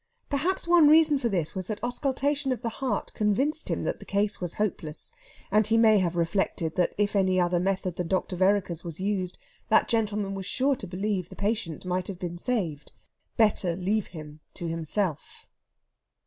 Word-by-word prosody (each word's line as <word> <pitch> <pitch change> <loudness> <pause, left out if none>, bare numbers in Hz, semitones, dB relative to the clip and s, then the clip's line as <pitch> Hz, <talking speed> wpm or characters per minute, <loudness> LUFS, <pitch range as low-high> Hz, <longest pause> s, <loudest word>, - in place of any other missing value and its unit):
Perhaps 340 +7 0
one 340 -3 +6
reason 305 -1 +6
for 240 - 0
this 170 -6 -1
was 185 -2 -5
that 215 -2 -4
auscultation 275 +3 0
of 255 -1 -3
the 230 - 0
heart 265 - -1
convinced 265 +10 0
him - - -1
that - - -2
the - - -10
case 200 0 0
was 175 -2 -4
hopeless, 170 -7 -3 0.4
and 215 +1 +4
he 225 +1 +3
may 220 -2 +6
have 175 -2 0
reflected 170 -1 0
that 180 - +1
if 205 0 +1
any 185 -2 +3
other 175 0 +2
method 185 -1 -1
than 180 - -2
Dr. 185 0 -1
Vereker's 185 -3 +1
was 170 -1 -7
used 190 -2 -2 0.3
that - - +4
gentleman 210 -3 0
was 195 -1 -5
sure 275 +2 +2
to 195 - -6
believe 190 0 -2
the - - -11
patient 200 -6 -2
might 180 0 -1
have 195 - -5
been 175 -1 -5
saved. 175 - -2 0.5
Better 200 -6 +3
leave 195 +3 0
him 155 -2 -10 0.2
to 175 - -4
himself. 165 +1 -3
195 Hz, 185 wpm, -27 LUFS, 175-225 Hz, 0.5 s, one